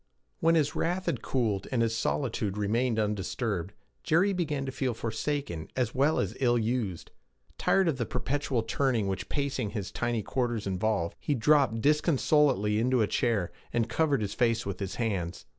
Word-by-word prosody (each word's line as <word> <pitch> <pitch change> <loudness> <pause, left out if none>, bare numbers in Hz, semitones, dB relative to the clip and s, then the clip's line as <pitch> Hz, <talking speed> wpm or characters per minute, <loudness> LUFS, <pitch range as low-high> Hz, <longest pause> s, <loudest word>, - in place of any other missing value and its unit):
When 165 -2 +4
his 150 -3 +2
wrath 180 +2 -1
had 140 -9 -1
cooled 110 -7 -1
and 120 -3 +2
his 115 0 0
solitude 110 -5 -1
remained 115 +3 +1
undisturbed, 105 -2 -1 0.3
Jerry 190 +6 +3
began 150 -6 -1
to 130 - -3
feel 130 -2 -2
forsaken 115 - -3
as 125 -3 0
well 140 +4 +2
as - - -1
ill 120 -2 +3
used. 110 -6 -2 0.5
Tired 195 -2 +3
of 145 -5 0
the 120 - -1
perpetual 135 -4 -1
turning 120 -2 +1
which 95 0 -3
pacing 135 -6 -1
his 100 -3 -5
tiny 120 -2 -1
quarters 120 -3 -1
involved, 95 -2 -1
he 145 - -1
dropped 130 -2 +3
disconsolately 145 - +3
into 125 0 +2
a - - +3
chair, 105 -8 0 0.2
and 120 -1 +1
covered 145 -4 +1
his 100 -1 -2
face 115 -2 +1
with 100 -2 -4
his 100 -2 -4
hands. 95 -7 -2
120 Hz, 170 wpm, -29 LUFS, 105-140 Hz, 0.5 s, When